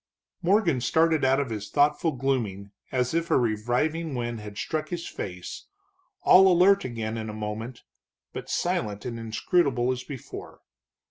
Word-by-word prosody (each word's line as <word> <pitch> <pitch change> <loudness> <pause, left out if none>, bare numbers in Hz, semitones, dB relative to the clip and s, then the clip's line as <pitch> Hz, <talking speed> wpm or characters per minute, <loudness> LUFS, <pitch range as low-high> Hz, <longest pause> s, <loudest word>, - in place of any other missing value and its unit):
Morgan 180 - +2
started 160 +3 +2
out 135 +1 +4
of 135 -4 -2
his 105 -2 -5
thoughtful 150 +4 +2
glooming 115 -7 -2 0.2
as 125 +1 0
if 165 0 0
a - - +4
reviving 125 +8 0
wind 120 -2 -3
had 105 -1 -9
struck 155 -1 -3
his 175 -1 -4
face, 90 -2 -7 0.6
all 190 0 +7
alert 190 +3 +5
again 115 -2 -4
in 110 0 -5
a - - -5
moment, 110 +3 -5 0.5
but - - -7
silent 105 -1 -1
and 120 -2 -4
inscrutable 120 +2 +1
as 130 0 -3
before. 135 -4 -9
125 Hz, 150 wpm, -26 LUFS, 110-160 Hz, 0.6 s, all